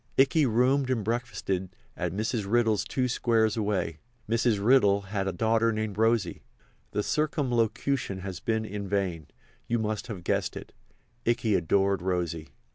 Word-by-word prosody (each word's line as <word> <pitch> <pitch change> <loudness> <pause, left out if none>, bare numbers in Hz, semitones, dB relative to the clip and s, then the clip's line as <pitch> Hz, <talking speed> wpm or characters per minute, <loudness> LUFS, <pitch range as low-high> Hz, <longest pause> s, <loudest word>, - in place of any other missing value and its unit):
Ikey 135 +2 +4
roomed 130 +4 +2
and 120 -5 0
breakfasted 100 -5 -2 0.2
at 85 -1 -2
Mrs. 105 +1 -2
Riddle's 115 -3 +3
two 130 -1 -1
squares 115 -3 +2
away. 100 -7 -1 0.3
Mrs. 115 0 +2
Riddle 100 -3 +4
had 95 0 -3
a - - +1
daughter 115 +5 +2
named 110 -2 -3
Rosy. 110 -5 +1 0.5
The 105 - -1
circumlocution 125 -7 0
has 95 -3 -5
been 110 +1 -1
in 100 -1 -5
vain—you 95 +3 -3
must 110 0 -2
have 100 -7 -6
guessed - - -1
it—Ikey 120 -2 -4
adored 95 +2 +2
Rosy. 85 -3 -2
110 Hz, 135 wpm, -28 LUFS, 95-120 Hz, 0.5 s, Ikey